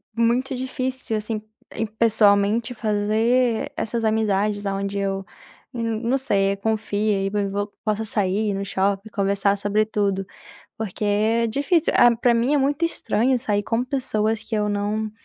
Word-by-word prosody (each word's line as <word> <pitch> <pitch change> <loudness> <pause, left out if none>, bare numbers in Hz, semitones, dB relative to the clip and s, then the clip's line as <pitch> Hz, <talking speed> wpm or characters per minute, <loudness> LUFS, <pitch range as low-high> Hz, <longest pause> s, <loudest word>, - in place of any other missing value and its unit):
muito 245 +4 +1
difícil, 255 -2 -3
assim, 215 0 -3 0.3
em 225 - -2
pessoalmente, 220 +1 +2
fazer 220 +2 +1
essas 230 +1 -2
amizades 210 -2 +1
aonde 200 0 -2
eu, 195 -1 -2 0.5
não 230 +2 -1
sei, 195 -6 +1
confie 210 -2 0
e - - -1
mei 205 -1 0
vo 205 +1 -2 0.2
possa 215 +1 0
sair 205 0 0
no 195 0 -3
shopping, 195 +2 -1
conversar 200 0 +1
sobre 205 +2 +1
tudo, 200 -3 -1 0.5
porque 215 -1 -4
é 220 +3 +2
difícil. 290 - +1
Ah, 240 -1 +6
pra 240 +1 +2
mim, 235 +4 +1
é - - +3
muito 285 +4 +1
estranho 255 -5 +1
sair 205 -3 0
com 230 +3 0
pessoas 225 -5 -1
que 225 - -5
eu 210 -1 +1
não 210 +1 -1
215 Hz, 150 wpm, -23 LUFS, 205-230 Hz, 0.5 s, Ah